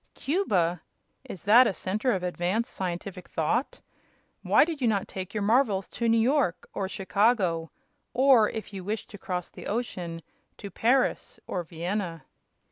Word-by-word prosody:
"Cuba! 185 - 0 0.4
Is 180 - -9
that 230 +5 +7
a - - 0
center 215 +8 -1
of 185 -4 -1
advanced 180 +6 -1
scientific 180 0 -5
thought? 165 - -1 0.6
Why - - +5
did 320 -4 -5
you 245 - +2
not 200 -3 +1
take 185 -1 -6
your 210 - 0
marvels 215 -3 +2
to 235 -1 -1
New 230 - +4
York 245 - +1
or 190 -1 -2
Chicago; 195 -5 +1 0.4
or, 250 -4 +5
if 220 -2 -7
you 190 -2 -6
wished 210 +3 -4
to 205 - -10
cross 180 -2 -4
the - - -9
ocean, 180 -7 -3 0.4
to 200 -3 -8
Paris 250 +8 +1
or 180 - -3
Vienna?" 170 -1 -4
200 Hz, 155 wpm, -27 LUFS, 180-235 Hz, 0.6 s, that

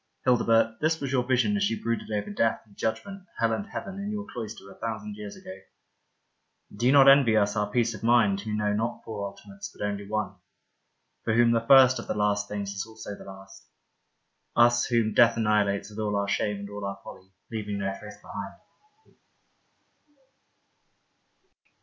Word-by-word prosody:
Hildebert, 115 -2 +3
this 160 +1 +1
was 135 -2 -3
your 130 -2 +2
vision 130 +11 +2
as 200 0 +1
you 115 - -3
brooded 115 -1 -3
over 105 -1 -3
death 115 +2 +1
and 105 -2 -22
judgment, 145 - -4
hell 115 -1 +1
and 205 - -3
heaven, 195 -3 -6
in 200 +1 -4
your 210 -1 -4
cloister, 115 -3 -6
a - - -16
thousand 110 -2 -5
years 105 -1 -8
ago. 95 - -10 1.2
Do 120 +4 0
you - - +5
not 140 -1 +7
envy 135 -5 +6
us 100 0 +2
our 105 -1 0
peace 115 +1 +1
of 110 - -9
mind 115 -4 +3
who 110 +1 -5
know 105 -1 0
not 115 +3 -2
four 105 -3 -4
ultimates, 100 0 -10
but - - -5
only 100 -1 -4
one? 105 -3 -2 0.9
For 110 - 0
whom 120 0 +5
the 115 - +3
lirst 130 +1 +6
of - - -8
the - - -2
Last 105 -1 +1
Things 100 -1 -4
is 95 - -3
also 110 -2 -9
the - - -13
last 95 0 -13 0.5
— - - -49
us, 120 0 +5
whom 115 -3 +1
death 120 -2 +5
annihilates 105 -2 +1
with 105 - -9
all 105 -1 -1
our 100 0 0
shame 105 +1 0
and 100 - -7
all 100 0 -7
our 100 0 -4
folly, 95 0 -12 0.2
leaving 105 -2 -3
no 100 -1 -2
trace 105 -1 -11
behind. 100 -1 -7
110 Hz, 185 wpm, -27 LUFS, 100-120 Hz, 1.2 s, not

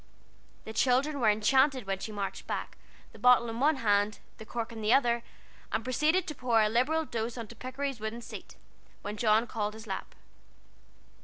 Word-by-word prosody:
The 220 - -7
children 270 +5 +2
were 225 -4 +4
enchanted 260 +4 +3
when 195 0 -2
she 215 - -5
marched 200 -2 -5
back, - - -4 0.4
the - - -15
bottle 250 -1 +5
in 225 - -5
one 300 +4 +4
hand, 205 -4 +2 0.2
the 220 - -10
cork 235 -1 -4
in 225 -1 -7
the 215 +1 +1
other, 240 -3 +4 0.5
and 225 - -1
proceeded 305 +8 +2
to 305 - -5
pour 245 -4 +2
a 215 -1 +4
liberal 290 +8 +1
dose 230 -2 -3
on 230 - -4
to 235 - -10
Pikery's 260 +1 -4
wooden 220 +2 -4
seat, - - -9 0.5
which 205 +1 -5
John 220 0 +3
called 210 -2 -3
his 220 0 -10
lap. 195 -3 -6
235 Hz, 185 wpm, -30 LUFS, 215-260 Hz, 0.5 s, bottle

